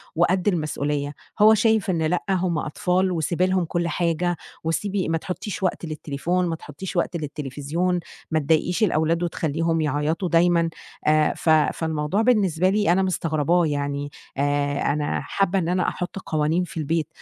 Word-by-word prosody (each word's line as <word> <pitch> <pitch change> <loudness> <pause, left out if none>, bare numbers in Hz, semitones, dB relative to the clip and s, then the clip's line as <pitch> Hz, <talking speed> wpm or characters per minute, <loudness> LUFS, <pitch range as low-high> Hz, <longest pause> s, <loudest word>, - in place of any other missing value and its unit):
وقد 180 +3 +2
المسؤولية. 150 -5 -1 0.3
هو 215 +1 +8
شايف 220 -2 +2
إن 165 -3 +1
لأ، 175 +3 0
هُم 180 -3 +1
أطفال 180 +4 0
وسيبي 175 +1 0
لهم 185 -2 +1
كل 170 +1 -1
حاجة، 175 0 0 0.3
وسيبي 185 +3 -1
ما 165 - +1
تحطّيش 190 +4 -5
وقت 180 -1 -1
للتليفون، 160 +3 -2
ما 165 - -1
تحطّيش 160 +4 -8
وقت 170 0 0
للتليفزيون 150 +4 -2 0.3
ما 160 - +2
تضايقيش 160 +7 +1
الأولاد 165 -2 +2
وتخلّيهم 165 0 0
يعيطوا 150 +5 0
دايمًا 170 0 +3 0.4
آآ، 155 0 +4
ف - - -1
فالموضوع 155 +3 +2
بالنسبة 195 -7 +3
لي 205 -3 +2
أنا 190 +2 +3
مستغرباه 170 -1 +1
يعني 145 -1 -2 0.3
آآ، 145 0 0
أنا 150 0 -1
حابة 195 -1 0
إن 170 -1 -1
أنا 180 0 +1
أحط 180 +2 -3
قوانين 155 +2 0
في 175 - -8
البيت 160 0 0
165 Hz, 155 wpm, -23 LUFS, 155-180 Hz, 0.4 s, هو